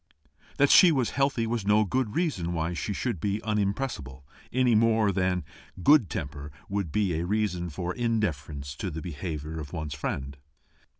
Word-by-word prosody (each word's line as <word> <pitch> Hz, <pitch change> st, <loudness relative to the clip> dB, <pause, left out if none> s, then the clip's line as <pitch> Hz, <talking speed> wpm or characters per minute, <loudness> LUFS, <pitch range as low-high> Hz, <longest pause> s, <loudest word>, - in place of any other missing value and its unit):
That 145 Hz, 0 st, +4 dB
she 180 Hz, -, +8 dB
was 130 Hz, -6 st, +1 dB
healthy 135 Hz, -4 st, +1 dB
was 115 Hz, -2 st, -1 dB
no 105 Hz, +2 st, +4 dB
reason 110 Hz, -, -1 dB
why 80 Hz, +1 st, -1 dB
she 85 Hz, -, -3 dB
should 100 Hz, -1 st, -2 dB
be 100 Hz, +5 st, -1 dB
unimpressible, 100 Hz, -, -2 dB, 0.3 s
any 125 Hz, -1 st, +3 dB
more 110 Hz, -1 st, +4 dB
than 90 Hz, -2 st, 0 dB, 0.3 s
that 90 Hz, -, -9 dB
good 145 Hz, -, +6 dB
temper 75 Hz, 0 st, -5 dB, 0.2 s
should 100 Hz, -6 st, -1 dB
be 100 Hz, -2 st, +1 dB
a 85 Hz, -, -2 dB
reason 95 Hz, -4 st, -1 dB
for 85 Hz, +3 st, -4 dB
indifference 75 Hz, -, -2 dB
to 95 Hz, -, -3 dB
the 80 Hz, -1 st, -6 dB
behaviour 80 Hz, -1 st, -5 dB
of 70 Hz, -2 st, -8 dB
one's 75 Hz, -4 st, -4 dB
friend. 70 Hz, -1 st, -4 dB
95 Hz, 165 wpm, -27 LUFS, 80-115 Hz, 0.3 s, she